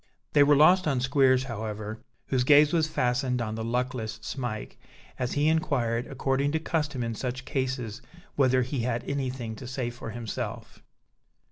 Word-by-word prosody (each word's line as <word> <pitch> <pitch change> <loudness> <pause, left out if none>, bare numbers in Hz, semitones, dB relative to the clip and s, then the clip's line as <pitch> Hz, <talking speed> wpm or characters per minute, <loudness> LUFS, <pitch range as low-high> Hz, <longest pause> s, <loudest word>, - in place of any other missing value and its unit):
They 145 - +6
were 145 +1 +6
lost 175 +5 +6
on 135 -4 +1
Squeers, 130 -1 +3
however, 110 -3 -5 0.3
whose 130 -2 +1
gaze 145 +3 +6
was 160 -2 +3
fastened 125 -2 0
on 110 -2 -2
the 110 0 -4
luckless 120 -1 -2
Smike, 120 -4 -5 0.4
as 125 -1 -1
he 145 +1 +2
inquired, 125 -7 +1
according 135 +2 0
to 160 - +1
custom 150 -5 -1
in 115 0 -2
such 125 +3 -4
cases, 130 -5 -3 0.3
whether 130 -2 +3
he 130 +2 -3
had 120 0 -1
anything 130 -5 -3
to 125 - -8
say 125 -1 -3
for 120 -1 -8
himself. 115 -1 -6
130 Hz, 160 wpm, -27 LUFS, 120-140 Hz, 0.4 s, They